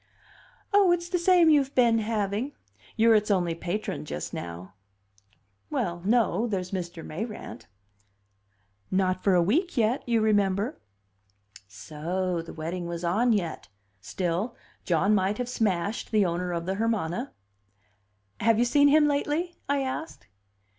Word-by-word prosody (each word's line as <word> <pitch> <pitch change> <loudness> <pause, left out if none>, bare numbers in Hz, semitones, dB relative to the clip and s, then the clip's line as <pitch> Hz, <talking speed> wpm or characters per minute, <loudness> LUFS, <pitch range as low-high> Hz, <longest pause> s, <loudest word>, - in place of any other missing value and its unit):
"Oh, 400 -3 +5
it's 345 0 0
the 360 -1 0
same 345 -2 +5
you've 280 -2 +2
been 235 -3 +4
having. 215 +4 -2 0.4
You're 225 +1 +5
its 210 -1 +2
only 180 -4 +1
patron 180 +4 -4
just 75 - -6
now." 85 +2 -7 1.0
"Well, 175 0 -2
no. 230 +2 +2
There's 185 -4 -3
Mr. 175 -3 -5
Mayrant." 165 - -7 1.2
"Not 185 -1 0
for 195 -2 +4
a 175 - +4
week 310 - 0
yet, 230 +3 +2
you 230 -1 +3
remember." 205 +4 +1 0.9
So 170 - -3
the 165 - -10
wedding 170 +2 -5
was 170 0 -5
on 215 +8 +2
yet. 180 -7 -2 0.3
Still, 180 - -2 0.3
John 190 +4 +2
might 200 +1 +1
have 250 - -3
smashed 205 -4 -1
the 210 -3 +3
owner 180 +1 -2
of 170 -1 -3
the 190 - -1
Hermana. 225 +1 -1 1.1
"Have 225 +1 +3
you 240 - +3
seen 285 +4 +4
him 295 +1 +5
lately?" 295 +4 -1 0.2
I 285 -1 +2
asked. 270 +5 -5
205 Hz, 140 wpm, -27 LUFS, 175-245 Hz, 1.2 s, Oh